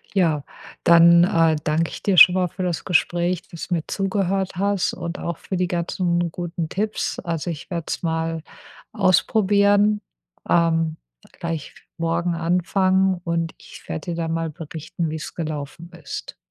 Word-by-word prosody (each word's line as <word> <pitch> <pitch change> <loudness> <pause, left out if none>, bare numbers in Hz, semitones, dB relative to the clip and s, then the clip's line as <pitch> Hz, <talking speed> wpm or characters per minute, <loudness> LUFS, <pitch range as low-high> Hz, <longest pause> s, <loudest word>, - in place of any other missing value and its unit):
Ja, 165 -6 +2 0.4
dann, 170 0 +7
äh, 165 -4 +3
danke 160 +3 0
ich - - -8
dir 195 -2 +1
schon 180 0 +9
mal 185 -1 +1
für 185 +2 -5
das 175 -2 -2
Gespräch, 175 0 +1
dass 170 - -8
du 180 - 0
mir 165 -2 -1
zugehört 195 -1 -1
hast 200 0 +1
und 170 0 -5
auch 170 -1 -4
für 190 - -4
die 180 0 0
ganzen 175 -1 -1
guten 170 -2 -4
Tipps. 210 +5 -2
Also, 170 -1 -3
ich 160 -2 -7
werde 170 -2 -3
es - - -3
mal 165 -1 -2 0.5
ausprobieren, 205 +2 +3 0.5
ähm, 165 -2 +2 0.4
gleich 165 -3 -5 0.2
morgen 170 +1 0
anfangen 185 +2 +1
und 170 -1 -1
ich - - -14
werde 80 - -4
dir - - -3
da 165 -1 -2
mal 165 0 -2
berichten, 160 +1 -5
wie' 155 - -3
s 155 - -7
gelaufen 155 +1 -5
ist. 140 - -7
170 Hz, 160 wpm, -22 LUFS, 165-185 Hz, 0.5 s, schon